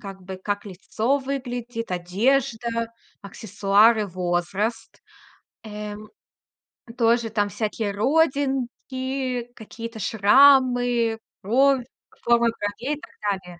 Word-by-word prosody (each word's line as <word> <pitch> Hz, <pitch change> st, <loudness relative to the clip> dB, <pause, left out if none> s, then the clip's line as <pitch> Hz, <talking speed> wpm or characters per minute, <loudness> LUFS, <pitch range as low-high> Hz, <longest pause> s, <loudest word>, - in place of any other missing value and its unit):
как 195 Hz, -2 st, -9 dB
бы, 190 Hz, +1 st, -7 dB
как 205 Hz, +2 st, -3 dB
лицо 215 Hz, +7 st, -1 dB
выглядит, 245 Hz, -4 st, -5 dB
одежда, 230 Hz, +5 st, 0 dB, 0.3 s
аксессуары, 205 Hz, +2 st, +2 dB
возраст. 185 Hz, +5 st, -3 dB, 0.6 s
Э, 210 Hz, -1 st, -7 dB
м, 210 Hz, 0 st, -11 dB, 0.9 s
тоже 235 Hz, -1 st, +2 dB
там 205 Hz, -2 st, 0 dB
всякие 215 Hz, +1 st, -3 dB
родинки, 260 Hz, -1 st, -1 dB
какие-то 230 Hz, +1 st, -9 dB
шрамы, 245 Hz, +1 st, +4 dB, 0.3 s
бровь, 260 Hz, +5 st, +3 dB, 0.4 s
форма 235 Hz, 0 st, +3 dB
бровей 230 Hz, +6 st, -3 dB
и -, -, -17 dB
так 225 Hz, -, -14 dB, 0.3 s
далее. 180 Hz, -2 st, -13 dB
230 Hz, 95 wpm, -23 LUFS, 205-250 Hz, 0.9 s, шрамы